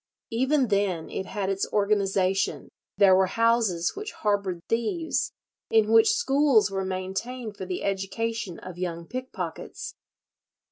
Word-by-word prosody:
Even 260 +2 +2
then 195 -5 0
it 190 - -4
had 200 -2 -3
its 195 0 -1
organization; 195 -2 +1 0.3
there 195 -2 +7
were 190 0 +4
houses 225 -5 +2
which 415 +1 -6
harboured 200 -4 -1
thieves, 235 +9 0 0.4
in 220 -1 +3
which 225 - +7
schools 275 - +3
were 195 0 -1
maintained 195 +5 -4
for 190 -2 -7
the 180 - -3
education 195 0 -2
of 180 -1 -9
young 170 -2 -3
pickpockets. 220 -8 -6
200 Hz, 130 wpm, -26 LUFS, 190-230 Hz, 0.4 s, there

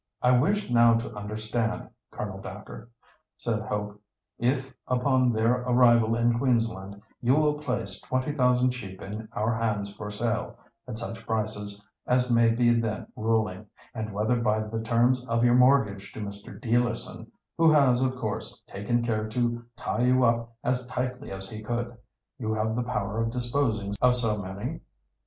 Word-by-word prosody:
"I 125 - +5
wish 155 +7 +2
now 115 -1 +6
to 115 -1 -3
understand, 110 +2 -3 0.2
Colonel - - -6
Dacre," 115 - -9 0.5
said 115 -2 -1
Hope; 105 -1 -4 0.4
"if, 130 +2 0
upon 125 0 +2
their 115 +3 +2
arrival 120 -2 +4
in 120 0 +2
Queensland, 115 -6 0 0.2
you 125 +2 +4
will 150 -1 +2
place 125 -9 -3
20,000 130 -1 +2
sheep 95 -7 -8
in 105 +3 -7
our 110 +2 0
hands 105 -3 -2
for 105 - -6
sale—at 115 +2 -4
such 115 0 -6
prices 105 -2 -3 0.2
as 125 0 +2
may 115 -1 +5
be 120 +1 +3
then 115 -2 -1
ruling—and 110 0 -2
whether 110 +4 +1
by 110 -1 +2
the 110 +1 -4
terms 120 +2 +2
of 115 0 +2
your 120 0 +5
mortgage 120 -6 +3
to - - -8
Mr. 100 -1 -7
Dealerson—who 120 +7 0
has 135 -5 +4
of 130 0 +1
course, 110 -4 -5
taken 120 +4 -1
care 110 -2 -1
to 120 +1 -1
tie 120 - -2
you 125 +1 +4
up 115 -1 +2
as 125 0 0
tightly 125 +1 -3
as 95 0 -5
he 110 +2 -7
could—you 120 0 -6
have 110 +1 0
the 125 - 0
power 115 -3 -2
of 115 - 0
disposing 120 -4 0
of 125 0 +6
so 115 -4 +3
many." 100 - -5
115 Hz, 150 wpm, -27 LUFS, 110-125 Hz, 0.5 s, now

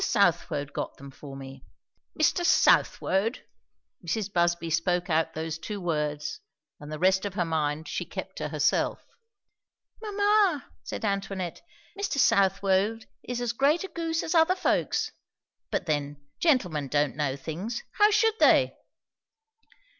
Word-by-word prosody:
Southwode 165 -7 +1
got - - -4
them 140 0 -11
for 135 0 -10
me." 135 0 -10 0.6
"Mr. 350 - +3
Southwode!" 225 - +3 0.6
Mrs. 200 +3 -2
Busby 170 -1 +1
spoke 175 +2 0
out 160 +1 +1
those 160 0 -4
two 205 +5 -5
words, 150 - -2 0.4
and 150 +1 -10
the 155 - -4
rest 190 +3 +3
of 200 -2 -4
her 175 - +1
mind 155 -1 -1
she - - -3
kept - - -7
to - - -3
herself. - - 0 1.0
"Mamma," 410 - +2 0.2
said - - -5
Antoinette, 195 -3 -3 0.3
"Mr. 400 -7 -2
Southwode 200 0 +2 0.2
is 245 -1 -4
as 240 -1 -1
great 285 +8 +2
a - - -4
goose 330 -1 -2
as 320 - -2
other 335 +2 +4
folks. - - 0 0.6
But - - -2
then, 145 -2 -1 0.2
gentlemen 180 - +2
don't 145 0 +1
know 145 -3 -1
things 175 - -5 0.2
how 415 0 +7
should 445 +1 +2
they?" - - +5
185 Hz, 140 wpm, -27 LUFS, 155-250 Hz, 1.0 s, how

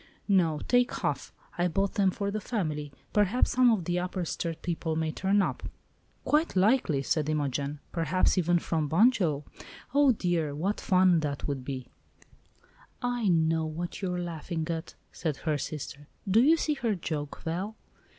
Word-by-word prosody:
"No, 170 -7 +3
take 245 0 +3
half; - - -2 0.3
I 175 - +3
bought 195 +3 0
them 200 -3 +3
for 200 +2 -2
the 215 +1 -3
family. 155 - -3 0.2
Perhaps 210 +4 +3
some 255 -1 +5
of 210 -7 +1
the 175 +1 0
Upper 180 0 -3
Sturt 165 0 -4
people 165 -2 -2
may 160 0 0
turn 195 +4 +2
up." - - -2 0.6
"Quite 305 -3 +2
likely," 190 - +3
said 155 +1 0
Imogen; 145 -1 -1
"perhaps 180 +2 +1
even 175 -1 +3
from 160 -3 -1
Bunjil! 175 - +3 0.5
Oh, 285 -1 +6
dear! 175 - -1
what 190 +8 -1
fun 185 -2 +4
that 145 -3 -3
would 140 -3 -3
be!" 130 -1 -5 1.2
"I 245 -3 0
know 160 -2 +2
what 170 +4 -5
you 190 -2 -1
are 180 - -2
laughing 165 -1 -4
at," 165 0 -5 0.2
said 155 -5 -3
her 150 -2 +1
sister. 145 0 -6 0.2
"Do 205 +4 +5
you 315 +6 +5
see 305 -1 0
her 235 -7 -1
joke, 150 -4 -4
Val?" 185 +7 -3
175 Hz, 165 wpm, -29 LUFS, 155-200 Hz, 1.2 s, Oh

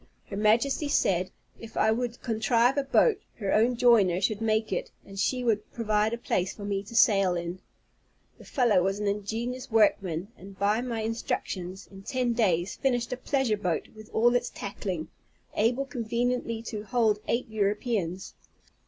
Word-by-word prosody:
Her - - -3
Majesty 230 +8 +2
said, 185 -9 +1 0.3
if 225 0 -10
I 220 - +4
would 240 +1 -2
contrive 235 +2 +2
a 280 - +1
boat, 405 - +3
her 200 -4 -2
own 235 +3 +3
joiner 220 -8 +4
should 210 +2 0
make 220 -1 +1
it, - - -2 0.2
and 195 0 -9
she 250 +4 0
would 215 -3 0
provide 215 -1 +1
a 235 - -2
place 185 -5 -1
for 205 - -8
me 200 -1 -1
to 230 - -10
sail 195 -5 +4
in. 175 +1 -4 0.8
The - - -12
fellow 235 -8 +3
was 195 +2 0
an 210 - -3
ingenious 225 +5 -3
workman, 200 -5 +2
and 195 +1 -12
by 205 +3 +2
my 235 -3 -3
instructions, 195 -4 -3
in 195 -1 -11
ten 245 +3 -1
days, 190 -6 +1
finished 245 -3 0
a - - -1
pleasure 260 -4 0
boat, 180 -5 -2
with 215 0 -12
all 240 +2 +3
its 245 0 +1
tackling, 190 -5 -5 0.5
able 240 +5 +1
conveniently 240 -1 -2
to 215 -2 -5
hold 220 -2 +1
eight 240 +2 0
Europeans. 205 -3 -1
220 Hz, 170 wpm, -28 LUFS, 195-240 Hz, 0.8 s, I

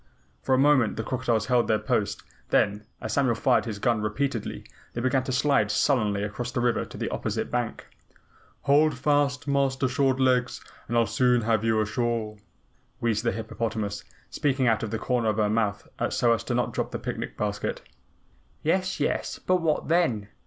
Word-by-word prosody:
For 130 - +2
a - - +1
moment 135 -5 +3
the 110 - -2
crocodiles 120 -3 0
held 120 0 +2
their 110 - +3
post, 105 -1 -1 0.3
then, 105 +1 +1
as 110 - -4
Samuel 130 -5 +2
fired 110 - +2
his 110 -3 -4
gun 115 +1 +1
repeatedly, 115 +2 -2 0.3
they 120 - -3
began 130 +1 +1
to 130 - -2
slide 130 -4 +2
sullenly 105 -4 +1
across 110 +4 -4
the 130 - -2
river 120 0 +1
to - - -11
the - - -2
opposite - - -3
bank. - - -2 0.8
"Hold 145 0 +3
fast, 145 0 +1
Master 135 -1 +1
Short 130 +1 +1
Legs, 125 -1 +2 0.3
and 120 - 0
I'll 115 - +4
soon 120 +3 +2
have 110 -1 +1
you 110 -1 +2
ashore," 110 -1 -2 0.6
wheezed 110 -2 0
the 115 - +1
hippopotamus, 110 -1 -3 0.3
speaking 135 -2 0
out 115 -2 +2
of 110 - -3
the 115 - -2
corner 120 -1 0
of 105 - -1
her 105 -1 +2
mouth 105 -2 -1 0.2
so 120 -1 +3
as 110 - -4
not - - +2
to - - -8
drop - - -2
the - - -4
picnic - - -5
basket. 105 -1 -3 0.8
"Yes, 185 +3 0
yes, - - -1
but 185 - +1
what 160 -3 0
then?" 130 - +1
120 Hz, 180 wpm, -26 LUFS, 110-135 Hz, 0.8 s, I'll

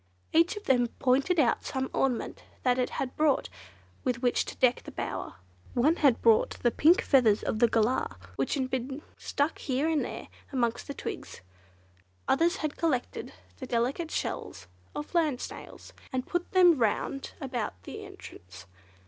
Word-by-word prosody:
Each 335 +6 +4
of 415 - -7
them 245 -6 +3
pointed 275 +7 +2
out 245 -6 +3
some 265 -1 -2
ornament 255 -4 -1 0.2
that 250 0 +2
it 250 - +1
had 260 -1 -3
brought 305 -2 +2 0.5
with 250 -1 -1
which 245 - +2
to - - -7
deck 250 -1 +3
the - - -10
bower. - - -4 0.4
One 295 +8 +3
had 275 -6 +3
brought 225 -2 +4
the 240 - +4
pink 325 +8 +5
feathers 230 -7 +4
of 215 - -2
a 235 - +7
Galah, 225 - +1 0.2
which 135 - 0
had 260 -2 -2
been 265 +3 -3 0.2
stuck 285 +3 -1
here 275 +2 0
and 320 -2 +1
there - - -6 0.2
amongst 235 -4 -1
the 280 - -5
twigs. - - -6 0.9
Others 335 +6 +3
had 305 -5 -3
collected 285 -7 -1 0.3
the 260 - -7
delicate 250 +8 0
shells 90 - -4 0.3
of 150 - -6
land 310 -7 +2
snails, - - -9 0.2
and 255 0 -2
put 350 0 -2
them 355 -6 +6
round 240 +4 -1
about 240 - -4
the - - -8
entrance. 90 +2 -12
260 Hz, 165 wpm, -29 LUFS, 240-305 Hz, 0.9 s, a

